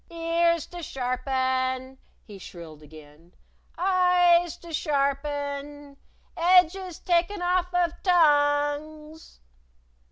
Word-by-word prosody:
"Ears 335 -1 0
to 350 0 -10
sharpen!" 260 -1 -2 0.3
he 205 -3 -12
shrilled 165 -4 -12
again. 155 +2 -17 0.4
"Eyes 355 -2 +3
to 340 -2 -12
sharpen! 285 -1 -3 0.4
Edges 360 0 +2
taken 355 +2 -1
off 360 0 0
of 350 -2 0
tongues!" 300 - 0
300 Hz, 85 wpm, -25 LUFS, 265-345 Hz, 0.4 s, Eyes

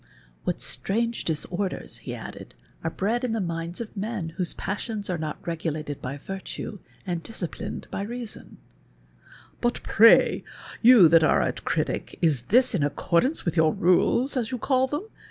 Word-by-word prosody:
What - - -1
strange 230 - -1
dis 160 -2 -1
orders, 185 +1 -2
he - - -6
added, - - -9 0.3
are - - 0
bred 230 +6 -1
in 245 -3 0
the 225 - 0
minds 170 -2 -3
of 230 -2 -7
men 205 -4 -3
whose 175 +1 -2
passions 205 0 -3
are 175 - -1
not 155 -1 -5
regulated 155 -3 -3
by 135 +3 -4
virtue, 195 +4 -6 0.3
and 175 -3 -2
dis 225 +1 -5
ciplined 170 - -5
by - - -3
reason, 235 +2 -6 0.5
" - - -25
But 240 -3 -2
])ray, 230 +1 +7 0.4
you 230 -7 +9
that 165 0 +6
are - - +4
a - - 0
critic, - - -2
is 150 -7 +2
this 250 +4 +4
in 185 - +1
accordance 170 - +1
with 170 - -1
your 160 -2 +3
rules, 235 - +3
as 235 -4 -1
you 255 - -3
call 260 +1 +2
them 295 +9 -3
195 Hz, 170 wpm, -26 LUFS, 165-235 Hz, 0.5 s, you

